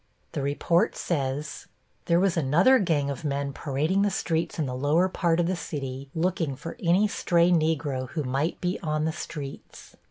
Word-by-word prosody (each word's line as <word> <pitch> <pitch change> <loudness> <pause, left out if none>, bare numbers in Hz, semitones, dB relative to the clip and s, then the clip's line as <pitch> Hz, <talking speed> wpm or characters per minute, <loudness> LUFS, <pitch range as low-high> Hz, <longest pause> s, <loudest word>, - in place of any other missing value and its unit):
The - - -3
report 145 +5 +1
says: 145 -1 -3 0.4
There 170 0 +3
was 190 -1 +2
another 170 - +4
gang 150 -8 +1
of 140 - -6
men 140 -1 -2
parading 155 +8 0
the 205 - +3
streets 170 0 -1
in 155 - 0
the 130 - -4
lower 145 +8 +2
part 170 -2 +1
of 175 - +3
the 185 +2 0
city, 135 -5 -5
looking 165 -4 0
for 165 - -7
any 185 +3 +3
stray 175 -3 +2
Negro 155 -6 0
who 155 -3 -3
might 135 +5 -1
be 180 +1 -1
on 155 -3 -1
the 160 - -1
streets. 145 -4 -8
160 Hz, 180 wpm, -26 LUFS, 140-175 Hz, 0.4 s, another